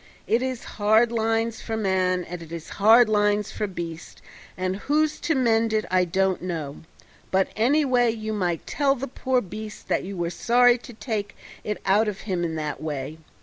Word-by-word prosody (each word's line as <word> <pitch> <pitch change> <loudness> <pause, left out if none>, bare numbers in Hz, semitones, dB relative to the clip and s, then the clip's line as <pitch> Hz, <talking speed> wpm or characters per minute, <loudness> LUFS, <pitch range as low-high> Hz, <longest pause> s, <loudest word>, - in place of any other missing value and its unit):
It 230 - +2
is 260 -2 -3 0.2
hard 220 +3 +4
lines 225 0 0
for 225 -1 -3
man 185 -3 +1
and 175 0 -7
it 165 -1 -11
is 170 -1 -7
hard 225 +3 +7
lines 210 -1 +1
for 210 - -2
beast, 170 -3 -7 0.4
and 185 +1 -1
who's 300 +7 0
to 320 - 0
mend 230 -3 +2
it 215 0 +1
I 185 -1 +3
don't 190 +2 0
know: 160 -6 -4 0.5
but 190 0 +2
anyway 250 0 +3
you 220 -1 -3
might 175 -5 -1
tell 275 -2 +1
the 270 +1 -5
poor 260 0 0
beast 215 +2 -9
that - - +1
you 195 0 -6
were 170 0 -2
sorry 245 +6 +4
to 240 - -12
take 215 -3 -4 0.3
it 210 -1 -3
out 205 +3 +3
of 205 -2 -4
him 185 -4 -2
in 165 -1 -2
that 150 -2 -4
way. 150 0 -5
210 Hz, 190 wpm, -24 LUFS, 180-235 Hz, 0.5 s, hard